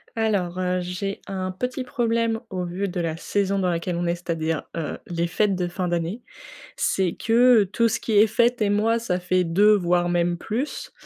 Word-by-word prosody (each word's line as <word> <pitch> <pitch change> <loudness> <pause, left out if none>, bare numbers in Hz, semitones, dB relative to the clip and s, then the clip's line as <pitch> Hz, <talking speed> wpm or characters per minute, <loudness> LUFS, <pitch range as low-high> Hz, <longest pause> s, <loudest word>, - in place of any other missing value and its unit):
Alors, 195 -6 0
heu, 180 0 0
j'ai 180 +3 -4
un 185 -1 -3
petit 250 +7 -3
problème 230 -3 0
au 180 -1 -2
vu 180 +3 -3
de 180 -1 -4
la 165 -1 -2
saison 200 +2 -1
dans 185 -2 +1
laquelle 170 +1 -2
on 175 +1 -1
est, 170 - +1
c'est-à-dire, 165 -2 -2
heu, 160 -3 -3
les 170 -1 -1
fêtes 195 +3 +1
de 180 -1 -1
fin 180 +1 -3
d'année: 175 +6 -2 0.5
c'est 185 -3 0
que, 225 - -2 0.3
heu, - - +1
tout 230 +5 +1
ce 220 - -1
qui 225 - -3
est 215 - +6
fête 235 +2 +2
et 210 - +2
moi 220 +3 +2
ça 185 -6 -1
fait 180 0 +1
2 200 +6 +4
voire 175 -2 +1
même 175 0 +1
plus. 230 - -4
185 Hz, 205 wpm, -24 LUFS, 175-215 Hz, 0.5 s, est